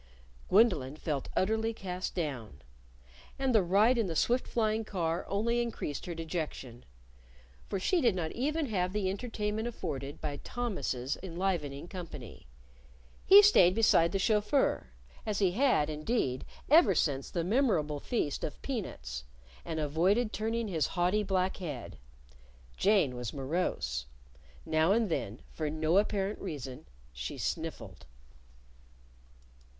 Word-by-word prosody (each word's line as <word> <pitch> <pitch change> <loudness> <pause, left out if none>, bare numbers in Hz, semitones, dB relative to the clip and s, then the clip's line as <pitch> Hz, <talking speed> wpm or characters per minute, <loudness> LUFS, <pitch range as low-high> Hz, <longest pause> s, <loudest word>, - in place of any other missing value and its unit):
Gwendolyn 180 - +4
felt 150 -3 -3
utterly 220 +3 +1
cast 185 -3 -4
down. 125 - -4 0.7
And 265 -2 +1
the 220 - +6
ride 205 +7 +4
in 220 - +1
the 165 - -3
swift 245 +9 +2
flying 220 -1 0
car 170 -4 -2
only 235 +4 +1
increased 220 - -4
her 170 - -4
dejection. 155 -7 -5 0.8
For 195 - -1
she 345 - +2
did 235 -6 +3
not 165 -3 -2
even 300 +5 -1
have 185 -6 -1
the 195 -3 0
entertainment 215 +1 -3
afforded 145 - -5
by 145 -2 -4
Thomas's 185 - -3
enlivening 170 -5 -2
company. 145 - -9 0.8
He 400 +2 +10
stayed 185 - +6
beside 170 -7 +4
the - - 0
chauffeur 210 - +1 0.3
as 210 -2 -2
he 195 -3 +3
had, 240 - +3
indeed, 150 - -1 0.2
ever 280 - +6
since 140 -3 0
the 170 - -2
memorable 180 - +1
feast 145 - -2
of 150 - -4
peanuts 65 - -4 0.4
and 160 -1 -4
avoided 185 +10 +1
turning 225 +1 -1
his 160 -7 0
haughty 180 +4 +2
black 190 -2 0
head. 140 - -6 0.8
Jane 195 -10 +3
was 125 -2 -5
morose. 145 - -2 0.6
Now 160 +4 +3
and 225 -2 +2
then, 120 -8 -3
for 155 -2 -3
no 160 +4 +2
apparent 205 0 -1
reason, 135 -8 -6 0.3
she - - -5
sniffled. - - -5
185 Hz, 130 wpm, -31 LUFS, 150-220 Hz, 0.8 s, He